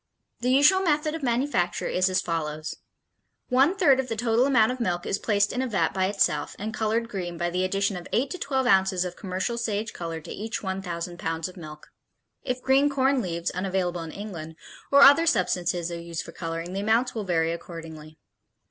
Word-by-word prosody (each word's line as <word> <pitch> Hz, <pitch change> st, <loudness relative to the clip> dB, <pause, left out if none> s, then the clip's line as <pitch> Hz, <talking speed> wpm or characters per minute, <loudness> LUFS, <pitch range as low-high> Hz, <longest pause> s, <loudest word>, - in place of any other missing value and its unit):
The 245 Hz, -, -1 dB
usual 290 Hz, +9 st, +5 dB
method 305 Hz, -4 st, +1 dB
of 325 Hz, -, -5 dB
manufacture 240 Hz, -7 st, 0 dB
is 185 Hz, +1 st, +1 dB
as 185 Hz, -, +1 dB
follows: 155 Hz, -2 st, -3 dB, 0.7 s
One 270 Hz, +8 st, +4 dB
third 285 Hz, -9 st, +4 dB
of 265 Hz, -, -1 dB
the 225 Hz, -, -3 dB
total 235 Hz, +3 st, +2 dB
amount 235 Hz, -4 st, +4 dB
of 255 Hz, -, -5 dB
milk 175 Hz, -7 st, -1 dB
is 195 Hz, -, -1 dB
placed 205 Hz, -2 st, +1 dB
in 250 Hz, -, -1 dB
a 260 Hz, -, -1 dB
vat 190 Hz, -8 st, 0 dB
by 190 Hz, 0 st, +1 dB
itself 200 Hz, +1 st, 0 dB
and 215 Hz, +2 st, -5 dB
colored 225 Hz, +1 st, 0 dB
green 180 Hz, -6 st, -5 dB
by 175 Hz, +1 st, -1 dB
the 180 Hz, +1 st, 0 dB
addition 195 Hz, +1 st, 0 dB
of 175 Hz, -1 st, -7 dB
eight 265 Hz, +3 st, 0 dB
to 365 Hz, -, -5 dB
twelve 265 Hz, -4 st, -1 dB
ounces 190 Hz, -3 st, +3 dB
of 180 Hz, -1 st, -5 dB
commercial 190 Hz, +5 st, -3 dB
sage 220 Hz, -1 st, -2 dB
color 165 Hz, -1 st, -5 dB
to 160 Hz, -, -10 dB
each 220 Hz, +2 st, -5 dB
1,000 175 Hz, -3 st, -4 dB
pounds 165 Hz, +1 st, -2 dB
of 185 Hz, -, -12 dB
milk. 155 Hz, -3 st, -11 dB, 0.5 s
If 250 Hz, -1 st, -4 dB
green 275 Hz, +2 st, +4 dB
corn 270 Hz, -1 st, +2 dB
leaves 170 Hz, -4 st, -3 dB
(unavailable 185 Hz, -2 st, -2 dB
in 165 Hz, -1 st, -7 dB
England) 170 Hz, -6 st, -7 dB, 0.4 s
or 280 Hz, 0 st, +8 dB
other 285 Hz, +4 st, +7 dB
substances 175 Hz, -, 0 dB
are 170 Hz, 0 st, -5 dB
used 170 Hz, -1 st, -5 dB
for -, -, -10 dB
coloring, 165 Hz, +1 st, -5 dB
the 195 Hz, -, -2 dB
amounts 230 Hz, +4 st, +2 dB
will 220 Hz, -, -3 dB
vary 165 Hz, -3 st, +1 dB
accordingly. 160 Hz, -2 st, -9 dB
195 Hz, 200 wpm, -26 LUFS, 175-245 Hz, 0.7 s, or